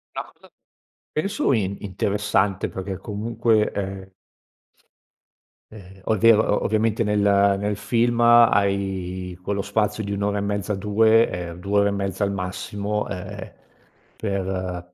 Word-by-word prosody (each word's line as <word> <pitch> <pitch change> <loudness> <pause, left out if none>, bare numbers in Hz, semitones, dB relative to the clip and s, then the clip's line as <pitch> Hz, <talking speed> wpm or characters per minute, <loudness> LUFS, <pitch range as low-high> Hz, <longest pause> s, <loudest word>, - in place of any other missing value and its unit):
La - - -3
cosa, - - -21 0.6
penso, 195 0 0
in 100 -5 0
interessante, 100 0 0
perché 95 0 -5
comunque, 110 +2 0
ehm 95 -1 -5 1.6
ehm, 95 -2 -13
o - - +2
è - - -3
vero 110 +1 +5
o 105 - 0
ovviamente 110 +1 +1
nel 105 -1 0 0.4
nel 105 0 -1
film 120 +3 0
hai 100 -6 +3
quello 100 +2 -2
spazio 105 +1 -1
di 100 0 -3
1 100 - -3
ora 105 0 0
e - - -1
mezza, 100 0 -2
2 110 +3 +3
ehm, 85 -1 -6
2 100 +2 +1
ore 100 0 +3
e - - -1
mezza 100 0 -2
al 100 - 0
massimo, 100 +2 -3
ehm, 95 +1 -7 0.6
per 95 -3 -4
100 Hz, 140 wpm, -23 LUFS, 95-105 Hz, 1.6 s, vero